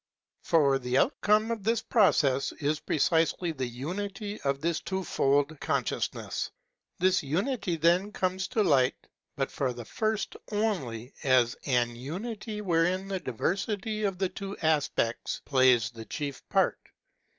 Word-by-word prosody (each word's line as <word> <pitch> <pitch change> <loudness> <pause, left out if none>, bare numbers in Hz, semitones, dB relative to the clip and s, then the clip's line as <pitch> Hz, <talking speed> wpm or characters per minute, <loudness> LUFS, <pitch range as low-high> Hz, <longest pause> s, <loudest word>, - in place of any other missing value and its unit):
For 140 -5 +3
the 125 0 0
outcome 215 - +3
of 225 -3 -3
this 225 +1 +1
process 140 - +3
is 150 +1 -1
precisely 165 +2 +1
the 130 -5 -3
unity 195 - -5
Of 140 0 0
this 165 +2 0
twofold 145 -6 0
consciousness. - - -2 0.5
This 185 +1 +3
unity, 180 - -1
then, 175 +5 +3
comes 190 0 -1
to 225 -4 +1
light, 135 -8 +3 0.4
but - - -2
for 130 -3 -1
the 120 -1 -8
first 215 - -2 0.2
only 145 - -2
as 130 -3 +4
an 120 -3 +1
unity 210 - -5
wherein 185 +1 +1
the 190 -1 -1
diversity 200 - -2
of 195 -3 0
the 190 0 0
two 195 +1 -6
aspects 145 -7 0
plays 130 -5 +4
the 115 -1 -9
chief 140 +4 -5
part. - - +2
165 Hz, 135 wpm, -29 LUFS, 135-200 Hz, 0.5 s, as